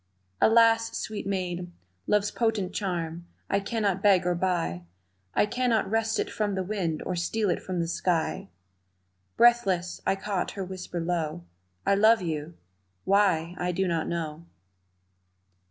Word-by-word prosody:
"Alas, 230 0 +4
sweet 215 -2 -4
maid, 180 -2 -3 0.4
love's 205 0 +2
potent 220 -5 0
charm 170 -3 -3 0.2
I 200 - +3
cannot 200 -2 -1
beg 195 -3 +4
or 180 - +2
buy, 175 - -1 0.5
I - - +4
cannot 240 0 +1
wrest 225 +2 0
it - - 0
from 205 -2 -1
the 190 - -1
wind 180 -5 -2
Or 185 - -2
steal 200 +3 0
it - - -2
from 185 -2 -3
the 170 - 0
sky 165 - -1 0.4
" 90 0 -46
Breathless, 195 -7 +3
I - - +2
caught 195 -1 -3
her 195 - -2
whisper 180 -1 -6
low, 165 - -2 0.4
"I - - +4
love 215 +1 +5
you 160 0 -4 0.5
why, 185 -4 +3
I 180 0 0
do 190 +2 0
not 165 -2 -1
know!" 165 -1 -4
185 Hz, 150 wpm, -27 LUFS, 170-210 Hz, 0.5 s, love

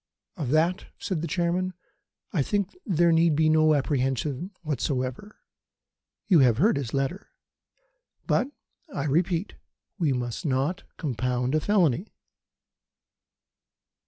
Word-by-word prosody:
"Of 150 -10 -3
that," 165 +5 +2
said 180 -5 -3
the 170 - -2
Chairman, 180 +1 0 0.6
"I 165 - +2
think 200 +6 -1
there 170 -3 +3
need 165 -1 +4
be 155 +1 +3
no 155 0 +5
apprehension 135 +3 -1
whatever. 140 - -2 0.9
You 180 -6 +5
have 125 -5 +5
heard 210 - +4
his 135 -5 -3
letter. 135 +9 -2 1.0
But, 255 - +2 0.4
I 140 - -3
repeat, 170 +6 0 0.5
we 160 -5 +2
must 120 -2 -3
not 145 +6 0 0.2
compound 125 -3 -1
a 155 - +3
felony!" 180 - +1
155 Hz, 115 wpm, -26 LUFS, 135-180 Hz, 1.0 s, no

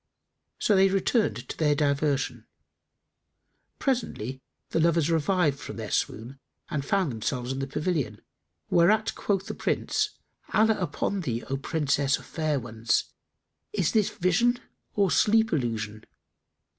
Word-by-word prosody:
So 210 - +3
they 195 0 +5
returned 195 +4 +1
to - - -5
their 150 -2 +3
diversion. 140 -1 0 1.3
Presently 135 - -2 0.3
the - - +1
lovers 165 -1 +3
revived 160 -3 +2
from - - -7
their 110 -2 -5
swoon 120 +5 -2 0.3
and 140 -2 -1
found 185 -1 +1
themselves 120 +3 -2
in 135 - -3
the 135 - -2
pavilion, 145 - -2 0.5
whereat 210 +6 +4
quoth 195 -2 -1
the - - -4
Prince, 425 -1 -1 0.4
"Allah 220 0 +4
upon 190 +2 -1
thee, 120 -7 -2
O - - +1
Princess 140 -1 +1
of - - -13
fair 155 -3 -1
ones, 115 -1 -1 0.6
is 190 -6 +1
this 215 -3 +3
vision 230 +8 +2 0.4
or 200 -3 +3
sleep 220 0 +4
illusion?" 110 -6 -2
155 Hz, 130 wpm, -27 LUFS, 135-195 Hz, 1.3 s, they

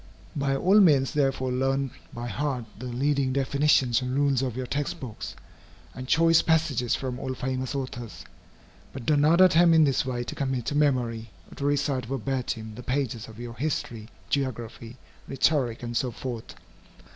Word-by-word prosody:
By 140 -2 0
all 190 +9 +4
means, 145 -9 +5
therefore, 135 -3 0
learn 135 +1 0 0.2
by 120 0 -6
heart 125 +1 -2
the 125 - -6
leading 135 +2 0
definitions 135 -2 +2
and 125 0 -3
rules 140 -2 +2
of 125 -3 -3
your 130 - -3
text 140 +3 -3
books, 120 -5 -7 0.6
and 130 0 -8
choice 165 +2 +5
passages 155 -7 +1
from 130 -2 -4
all 130 -1 -4
famous 130 +1 -3
authors. 125 -4 -6 0.7
But 130 -3 -7
do 150 - +3
not 155 +5 +4
attempt 170 -2 +6
in 160 - +6
this 135 -4 +2
way 125 -2 -3
to - - -6
commit 130 -3 -2
to 145 - -2
memory, 120 -6 +1 0.2
or - - -11
to 140 - -4
recite 140 -3 0
verbatim, 125 -4 -3
the 120 - -9
pages 125 -4 -2
of 110 0 -12
your 120 -1 -6
history, 120 -5 -3 0.2
geography, 120 -3 -3 0.3
rhetoric, 135 -4 +1
and 120 0 -5
so 125 +2 +1
forth. 120 -1 -7
130 Hz, 170 wpm, -26 LUFS, 120-145 Hz, 0.7 s, attempt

